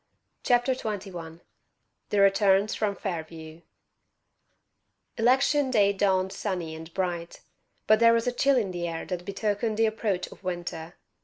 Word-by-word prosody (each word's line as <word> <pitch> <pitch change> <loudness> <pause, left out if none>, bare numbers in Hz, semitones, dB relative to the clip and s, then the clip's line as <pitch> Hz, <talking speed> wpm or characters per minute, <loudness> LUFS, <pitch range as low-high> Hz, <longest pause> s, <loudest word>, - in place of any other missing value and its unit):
CHAPTER 245 +1 +2
XXI 185 -8 -6 0.7
THE 205 - +2
"RETURNS" 195 +1 +4
FROM 205 -2 -1
FAIRVIEW 160 -3 -6 1.6
Election 265 +4 +3
day 205 -5 +3
dawned 190 -1 +1
sunny 180 -5 -3
and 160 +1 -9
bright; 175 -3 -3 0.4
but 215 0 +5
there 230 0 +6
was 230 0 +1
a 245 - +1
chill 270 +2 +2
in 205 -6 0
the 175 -1 -3
air 165 -1 -5
that 180 -1 -5
betokened 210 +2 -2
the 225 - +4
approach 215 -4 -1
of - - -15
winter. 175 -2 -5
195 Hz, 140 wpm, -27 LUFS, 175-220 Hz, 1.6 s, there